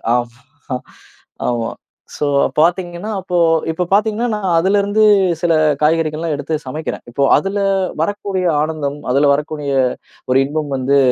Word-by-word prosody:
ஆமா, 125 +3 -5 0.7
ஆமா. 115 -2 -2 0.5
சோ - - -1 0.3
பாத்தீங்கன்னா, 175 +4 0
அப்போ 180 -1 -2 0.3
இப்ப 180 +2 -2
பாத்தீங்கன்னா 215 +3 +2
நான் 190 -5 0
அதுல 195 +4 +2
இருந்து 205 +2 +1 0.4
சில 170 -2 +2 0.3
காய்கறிகள்லாம் 160 0 +1
எடுத்து 155 +2 -3
சமைக்கிறேன். 155 +4 -5
இப்போ 140 +3 0
அதுல 195 +1 -2 0.4
வரக்கூடிய 195 +1 -2 0.2
ஆனந்தம், 150 -2 -3
அதுல 140 +2 +3
வரக்கூடிய 150 -1 -3 0.6
ஒரு 130 - +4
இன்பம் 150 0 -3
வந்து, 135 +2 +2
160 Hz, 125 wpm, -17 LUFS, 140-185 Hz, 0.7 s, ஒரு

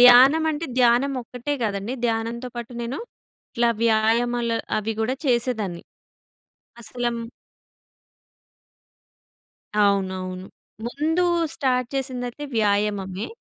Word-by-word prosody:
ధ్యానమంటే, 295 +6 +7
ధ్యానమొక్కటే 250 +2 +2
గాదండి, 205 +3 -2
ధ్యానంతో 230 +2 -2
పాటు 235 +1 -6
నేను 235 +4 -3 0.6
ఇట్లా 235 -2 +3
వ్యాయామాలు 230 +1 +2 0.2
అవి 215 +1 -1
గూడా 250 +4 0
చేసేదాన్ని. 230 -8 0 1.0
అసలమ్ 240 +1 -3 2.5
అవునవును. 190 -2 +1 0.4
ముందు 310 +7 0 0.3
స్టార్ట్ 250 -2 +1
చేసిందైతే 255 +1 -3
వ్యాయామమే. 205 -2 0
235 Hz, 75 wpm, -24 LUFS, 215-250 Hz, 2.5 s, ధ్యానమంటే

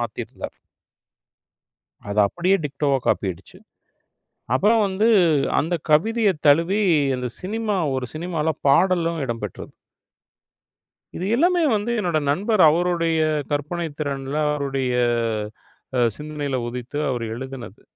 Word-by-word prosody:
மாற்றியிருந்தார். 120 +1 -6 1.6
அது 105 +1 0
அப்படியே 180 - +1
டிக்டோவா 140 -1 0
காப்பி 100 - +1
ஆகிடுச்சு. 90 +2 -10 1.0
அப்புறம் 215 - +3
வந்து 200 +4 +1 0.5
அந்தக் 165 0 -2
கவிதையை 215 +5 +3
தழுவி 170 +8 +4 0.3
அந்தச் 125 -1 -5
சினிமா 210 +1 -2 0.2
ஒரு 130 -1 -2
சினிமாவில் 160 -2 -2
பாடலும் 170 +1 +3
இடம்பெற்றது. 120 -2 -6 1.5
இது 180 - -3
எல்லாமே 350 +4 +3
வந்து 210 +3 -1
என்னுடைய 170 -6 0
நண்பர் 205 +5 +1
அவருடைய 170 0 +1 0.3
கற்பனைத் 150 +1 -3
திறனில், 140 0 -3
அவருடைய 135 -3 -1 1.0
அ - - +2 0.2
சிந்தனையில் 145 -4 -4
உதித்து 125 +4 -6
அவர் 120 -2 -2
எழுதியது. 130 0 -8
155 Hz, 105 wpm, -22 LUFS, 135-185 Hz, 1.6 s, தழுவி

